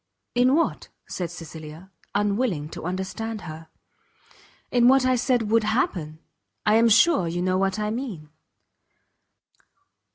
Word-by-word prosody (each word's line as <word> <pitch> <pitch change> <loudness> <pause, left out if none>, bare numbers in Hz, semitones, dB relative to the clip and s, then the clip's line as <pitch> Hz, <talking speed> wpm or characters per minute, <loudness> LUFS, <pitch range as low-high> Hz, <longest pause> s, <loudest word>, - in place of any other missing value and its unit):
"In 250 +3 +4
what?" 330 - 0 0.2
said 175 -2 -4
Cecilia, 165 +1 -10 0.2
unwilling 205 - 0
to - - -8
understand 190 +4 -4
her. 160 -1 -9 1.0
"In 240 -1 +4
what 265 0 +5
I 255 0 +3
said 240 -3 0
would 225 -1 +4
happen? 180 -8 -1 0.5
I 210 - +4
am 230 +1 +5
sure 220 - +4
you 175 +2 -2
know 185 0 +1
what 195 +1 0
I 210 0 -1
mean." 215 - -6
205 Hz, 130 wpm, -24 LUFS, 175-235 Hz, 1.0 s, what